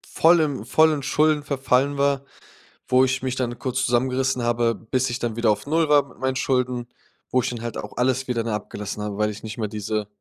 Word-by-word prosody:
vollen 160 -8 +4
vollen 155 +2 +3
Schulden 150 +1 +2
verfallen 140 0 +1
war, 140 -1 +2 0.7
wo 130 +1 +4
ich 130 0 -1
mich 130 -1 -2
dann 120 -2 -3
kurz 130 +1 -1
zusammengerissen 130 +1 +1
habe, 120 0 +1
bis 130 +3 -1
ich 120 +1 -3
dann 120 -3 -2
wieder 115 -2 +3
auf 105 +4 -3
0 160 +2 +2
war 145 -1 +4
mit - - -18
meinen 130 0 -1
Schulden, 125 -2 0 0.4
wo 130 - +3
ich 125 - -2
dann 120 -2 -6
halt 120 -1 -5
auch 105 - -7
alles 130 +1 +1
wieder, 120 -2 -1
ne, 115 - -3
abgelassen 105 0 -5
habe, 105 -1 -4
weil 105 0 +1
ich 105 0 -8
nicht 110 0 -7
mehr 110 - -1
diese 105 0 -3
125 Hz, 215 wpm, -23 LUFS, 115-135 Hz, 0.7 s, vollen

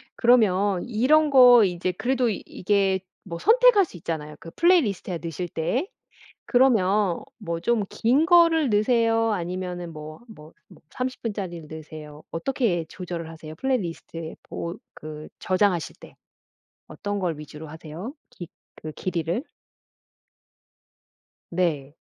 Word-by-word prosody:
그러면 205 -6 +3
이런 285 +7 +3
거 250 -4 +8
이제 180 -1 0
그래도 250 +6 0
이게 195 -1 0 0.2
뭐 170 -3 -6
선택할 460 - +5
수 - - -16
있잖아요 155 -2 -5
그 165 - -10
플레이리스트에 225 - +2
넣으실 165 +2 -5
때. 200 - -1 0.7
그러면 210 -7 +3 0.2
뭐 170 -6 -4
좀 230 +2 +1
긴 270 +8 +2
거를 330 -5 +5
넣으세요 225 +1 +2
아니면은 180 -2 -4
뭐, 155 0 -9
뭐 155 -7 -14 0.2
막 180 - -18
30 255 0 -4
분짜리를 185 -8 -5
넣으세요? 155 -1 -10
어떻게 190 -3 -1
조절을 170 -2 -6
하세요? 160 -1 -10
플레이리스트에 170 -7 -3 0.2
뭐 170 +1 -4 0.2
그 155 0 -9
저장하실 185 -3 +1
때 - - -14 0.7
어떤 205 -1 -4
걸 165 -5 -2
위주로 150 +1 -10
하세요? 160 - -8 0.2
기 175 - -9 0.3
그 155 - -8
길이를? 175 - -2 2.1
네. 155 -6 -1
185 Hz, 270 characters per minute, -24 LUFS, 165-235 Hz, 2.1 s, 거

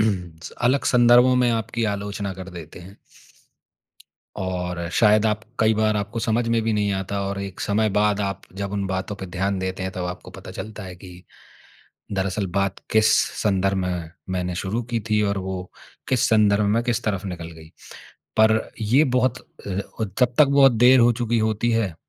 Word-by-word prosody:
स 90 -7 -2 0.2
अलग 140 +2 +1
संदर्भों 120 +1 +5
में 125 -1 +3
आपकी 115 0 -1
आलोचना 100 0 -4
कर 95 0 -9
देते 85 -3 -10
हैं। 95 +3 -13 1.4
और 90 -2 -3
शायद 105 -1 +4
आप 105 0 0 0.2
कई 110 -1 +4
बार 110 0 +1
आपको 105 +3 -3
समझ 115 +1 0
में 115 0 +2
भी 110 0 0
नहीं 105 -1 +1
आता 95 +1 -3
और 100 0 -4
एक 100 -1 -7
समय 110 +1 +1
बाद 105 0 +1
आप 100 -1 -3
जब 100 0 -4
उन 100 -1 -2
बातों 95 +2 -3
पे 95 - -7
ध्यान 95 +2 -2
देते 95 0 -3
हैं, 95 - -3
तब 90 -1 -4
आपको 90 0 -7
पता - - -10
चलता 110 -1 -7
है 90 -1 -8
कि, 90 0 -13 0.9
"दरअसल, 100 0 -1
बात 100 -1 0
किस 110 0 +4 0.3
संदर्भ 95 -1 +1
में 90 -3 -3 0.2
मैंने 90 -1 -2
शुरू 95 +6 -2
की 115 - +1
थी 105 0 +3
और 100 - -2
वो 95 -1 -4 0.5
किस 130 -4 +2
संदर्भ 105 -1 +4
में 115 - +2
किस 120 -1 -1
तरफ़ 100 -3 -2
निकल 85 -2 -6
गई।" 80 -1 -14 0.7
पर 110 0 +3
ये 120 +8 +4
बहुत 125 0 +1 0.3
अ, - - -4
और 100 +3 -4
तब 125 -1 +2
तक 150 - +8
बहुत 140 -1 +6
देर 125 +3 +6
हो 120 0 +5
चुकी 120 0 -1
होती 110 +1 0
है 110 -6 0
100 Hz, 185 wpm, -23 LUFS, 95-115 Hz, 1.4 s, तक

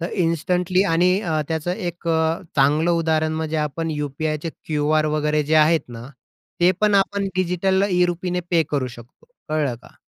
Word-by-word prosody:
तर 170 - -3
इन्स्टंटली 180 +3 +1
आणि 180 +3 +3
अ, 160 -6 -1
त्याचं 160 +2 -2
एक 175 -4 -5
अ, 160 0 +1 0.2
चांगलं 150 +5 +3
उदाहरण 160 -2 +1
म्हणजे 160 0 -2
आपण 155 +2 -2
यू-पी-आयचे 150 +2 -3 0.2
क्यूआर 155 0 +1
वगैरे 150 0 +1
जे 150 +2 0
आहेत 155 +1 +5
ना, 120 0 -9 0.5
ते 175 - +6
पण 210 -1 +3
आपण 200 0 +1
डिजिटलला 190 +2 +1
ई-रुपीने 180 0 0
पे 170 -2 +4
करू 140 -3 0
शकतो. 120 0 -13 0.2
कळलं 150 -5 0
का? - - -18
160 Hz, 160 wpm, -22 LUFS, 150-180 Hz, 0.5 s, ते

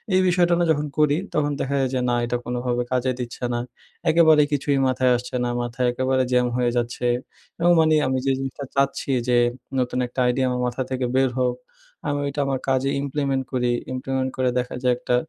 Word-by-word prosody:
এই 185 - +5
বিষয়টা 175 -1 +3
না - - +3
যখন 150 -1 0
করি 150 -1 +3 0.2
তখন 145 -1 +1
দেখা 140 - -2
যায় 130 - +1
যে, - - +1
না, 120 - +2
এটা 120 +1 -1
কোনোভাবে 125 0 -1
কাজে 130 0 +1
দিচ্ছে 120 0 -6
না। 120 - -1 0.5
একেবারে 160 -2 +6
কিছুই 140 0 +1
মাথায় 130 0 +2
আসছে 125 +1 -7
না, 120 - 0
মাথায় 120 +1 -1
একেবারে 130 +1 +1
jam 125 0 +3
হয়ে 120 -1 +1
যাচ্ছে 120 +1 -1 0.5
এবং 175 +1 +4
মানি 155 -1 +4
আমি 130 0 0
যে 135 - +3
জিনিসটা 135 +1 -5
চাচ্ছি 140 0 0 0.2
যে 120 - +4 0.4
নতুন 125 0 -1
একটা 125 - -7
idea 130 +2 +1
আমার 125 0 -1
মাথা 125 +2 -3
থেকে 130 -1 -1
বের 130 -1 +3
হোক, 125 -1 +1 0.5
আমি 145 - -1
ওইটা 140 +1 -2
আমার 135 -1 -1
কাজে 135 +1 +1
implement 140 -1 -1
করি। 125 -2 +1 0.2
implement 130 0 -2
করে 130 -1 +2
দেখা 125 - -4
যায় 125 -1 +4
একটা 125 0 0
130 Hz, 200 wpm, -23 LUFS, 125-140 Hz, 0.5 s, একেবারে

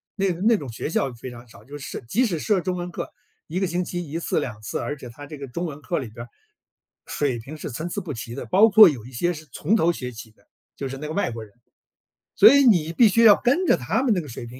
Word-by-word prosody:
那 195 -2 +1
个 170 - -10
那 225 +3 +4
种 140 - -6
学 115 - -5
校 135 -4 0
非 120 +2 -9
常 120 0 -12
少， 100 -2 -16
就 145 +2 -9
是 140 - -9
设 - - -5
即 245 - +2
使 175 -8 -2
设 195 +2 +1
中 185 0 -2
文 175 0 -5
课， - - -6 0.4
1 175 +4 -3
个 195 - +1
星 180 +1 -1
期 175 -3 -5
1 165 +3 -3
次、 - - -1
2 110 -4 -6
次， - - -4
而 145 - -3
且 125 -4 -10
它 145 +5 -11
这 150 +1 -9
个 140 -1 -7
中 170 +8 -4
文 150 -3 -7
课 170 +5 -2
里 130 -6 -4
边 120 +2 -9
儿， - - -21 0.8
水 135 -5 -1
平 140 +7 -9
是 145 - -6
参 160 +9 -5
差 205 - -3
不 170 -6 -6
齐 115 0 -7
的， - - -6
包 210 +5 +5
括 215 -1 +9
有 130 -9 -2
一 130 - -12
些 175 +9 -1
是 155 -1 -11
从 215 - 0
头 170 -6 +3
学 125 -6 -6
起 115 -1 -11
的， 110 - -31 0.3
就 135 - -5
是 135 +1 -6
那 150 +2 -6
个 155 - -5
外 200 -8 -1
国 115 -1 -7
人。 105 - -15 0.8
所 - - +8
以 280 0 +6
你 170 - +3
必 230 +5 +6
须 230 +3 +3
要 210 -3 +9
跟 280 +10 +1
着 - - +4
他 175 - -1
们 250 -5 +3
那 180 - 0
个 150 - -10
水 120 -1 -8
平 125 +2 -11
155 Hz, 305 characters per minute, -23 LUFS, 125-185 Hz, 0.8 s, 括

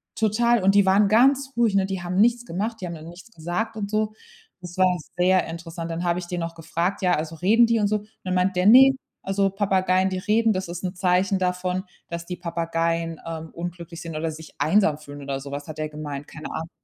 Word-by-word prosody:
Total. 225 0 +2
Und 195 +1 +5
die 200 -1 +5
waren 200 +2 +4
ganz 270 +4 +4
ruhig, 230 -4 +2
ne? 195 -1 +3
Die 190 -2 -4
haben 180 +1 -4
nichts 240 +2 +4
gemacht, 215 +6 -3
die 180 - -3
haben 170 - -5
dann 155 +1 -10
nichts 185 +7 -13
gesagt 175 +7 -3
und 200 -1 -3
so. 215 0 0 0.5
Das 180 0 -9
war 185 -1 +3 0.2
sehr 185 +1 +3
interessant. 165 0 -6
Dann 170 +2 -3
habe 175 0 +1
ich 180 - -4
den 175 0 -4
noch 165 0 -4
gefragt, 170 +4 -2
ja, 180 -1 +3
also: 160 +1 -4
„Reden 220 +8 +4
die 230 -1 +2
und 205 - +2
so?" 215 +1 +1
Und 210 +1 -12 0.2
dann 185 -1 -2
meint 185 +1 +1
der: 180 +1 +1
„Ne, 265 +5 +8 0.3
also, 195 0 0
Papageien, 190 -1 +2
die 185 - -3
reden, 220 +3 +2
das 185 -1 -3
ist 175 +1 -6
'n 180 0 -3
Zeichen 185 +1 +2
davon, 180 0 -1 0.2
dass 170 0 -6
die 180 +1 -5
Papageien, 165 -1 -2
ähm, 160 -1 -6
unglücklich 170 0 -7
sind 165 -2 -7
oder 160 +1 -2
sich 155 0 -11
einsam 155 0 +3
fühlen" 145 -1 -11
oder 140 -1 -3
sowas 140 +2 -7
hat 155 - -8
er 155 0 -3
gemeint. 150 -2 -6
Keine 155 - -8
Ahnung. 160 +1 -5
180 Hz, 230 wpm, -24 LUFS, 165-200 Hz, 0.5 s, Ne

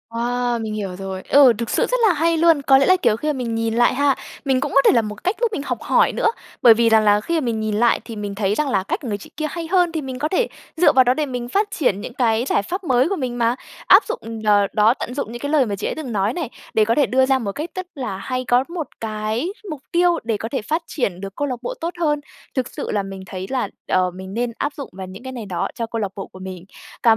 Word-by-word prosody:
Wow! 240 0 0
Mình 215 -1 -4
hiểu 195 -4 -4
rồi. 190 0 -5
Ừ, 275 -4 +7
thực 235 -1 -3
sự - - +2
rất - - 0
là 375 - +4
hay 330 +1 +1
luôn! 325 -3 +4
Có 270 -1 +5
lẽ 275 - +3
là, 370 - +6
kiểu, 215 - +3
khi 300 - -4
mà 300 - +1
mình 240 -4 -3
nhìn 225 0 -1
lại 240 +2 +3
ha, 280 0 +2 0.3
mình 265 -2 +2
cũng 285 - -2
có 275 - +7
thể - - +7
là 235 - +4
một 210 -1 -7
cách 370 +4 +1
giúp 475 - +4
mình 300 - -3
học - - -3
hỏi - - +3
nữa. - - +1 0.3
Bởi 235 -3 +9
vì 230 +1 +3
rằng 220 -1 +5
là 210 0 +4
khi 335 +7 0
mà 255 - -3
mình 225 -2 -1
nhìn 215 -1 -1
lại 235 +2 +3
thì 230 - -7
mình 205 -1 -5
thấy 200 0 0
rằng 300 -2 0
là 190 -7 +1
cách - - -2
của 260 - -6
người 205 - -2
chị 200 - -13
kia 310 - -1
hay 335 0 -5
hơn, 355 -1 +3
thì 320 -1 -2
mình 260 -2 -6
có 300 - 0
thể 420 +8 +1 0.3
dựa 350 - +5
vào 260 - +6
đó 250 0 +3
để 300 +3 -1
mình 245 -3 -5
phát 410 +5 0
triển 205 - 0
những - - -7
cái 235 -1 +1
giải - - +2
pháp 370 - -4
mới 260 +1 +2
của 395 - 0
mình 250 -6 -3
mà. 235 +1 +2 0.3
Áp 385 +4 +8
dụng 230 - -5
đ - - -5 0.3
đó, 215 +3 +5
tận 250 - -6
dụng 265 -4 -3
những 240 - -7
cái 285 - -3
lời 295 -4 +4
mà 205 -3 -2
chị - - -3
ấy - - -3
từng 290 -6 -5
nói 205 +2 0
này 320 -9 -3 0.2
để 215 -1 +4
có 230 - +2
thể 290 - +4
đưa 260 +1 +3
ra 265 0 +2
một 210 -5 -3
cách 305 - -5
rất 370 -1 -4
là 250 -8 -4
hay, 255 +5 -3
có 245 +1 +3
một 340 -4 -4
cái 220 - -2 0.2
mục 300 -4 -6
tiêu 350 0 +3
để 225 -2 -1
có 225 - -5
thể 265 -5 -2
phát 315 +9 -1
triển 195 - -2
được 195 0 -7
câu 290 - -1
lạc 255 - -2
bộ 240 - -4
tốt 340 +2 -2
hơn. 295 -3 +1 0.4
Thực 255 -2 0
sự - - -5
là 205 -1 0
mình 195 -1 -7
thấy 190 0 -6
là, 255 -5 -1 0.2
ờ, 185 -1 +2
mình 190 +2 -9
nên 240 +1 -1
áp 290 0 -2
dụng 280 - -7
vào 190 0 -7
những 195 +7 -10
cái 260 - -6
này 230 -4 -6
đó 175 -3 -2
cho 230 - -2
câu 230 0 -4
lạc 200 -2 -2
bộ 195 - -6
của 185 - -14
mình. 185 -1 -8 0.4
Cảm 230 - +7
245 Hz, 305 wpm, -21 LUFS, 215-290 Hz, 0.4 s, Bởi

